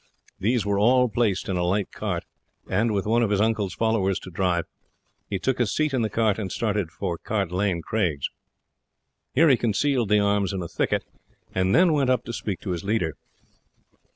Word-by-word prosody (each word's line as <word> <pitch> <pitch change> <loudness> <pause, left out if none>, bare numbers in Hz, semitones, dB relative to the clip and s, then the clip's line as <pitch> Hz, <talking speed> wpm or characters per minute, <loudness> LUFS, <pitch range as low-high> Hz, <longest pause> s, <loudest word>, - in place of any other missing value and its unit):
These 115 +3 +1
were 100 -1 +1
all 125 +3 +4
placed 105 -3 0
in 95 - -1
a 90 - 0
light 95 +3 0
cart, - - -3 0.4
and 110 +5 +1
with 100 -2 -1
one 115 +3 +2
of 115 - +2
his 100 -1 +1
uncle's 105 -3 0
followers 110 -4 +1
to 95 - -10
drive, 90 -2 0 0.6
he 95 - -1
took 130 +7 -1
his 115 -5 +1
seat 155 -2 +1
in 130 - +1
the 110 - 0
cart, 110 -2 +1
and 95 -3 -4
started 105 -6 -1
for 85 0 -4
Cart 100 -5 -2
Lane 90 -2 0
Craigs. 85 -11 -1 1.0
Here 165 - +6
he 130 - +5
concealed 120 +1 +1
the 105 - +5
arms 100 -2 +1
in 95 -2 -3
a - - -5
thicket, - - -1 0.5
and 95 +1 +2
then 175 -2 +5
went 140 -4 +2
up 125 -2 +2
to 120 - -6
speak 100 -4 -4
to 95 - -4
his 90 +1 -3
leader. 100 -6 0
105 Hz, 200 wpm, -25 LUFS, 95-115 Hz, 1.0 s, Here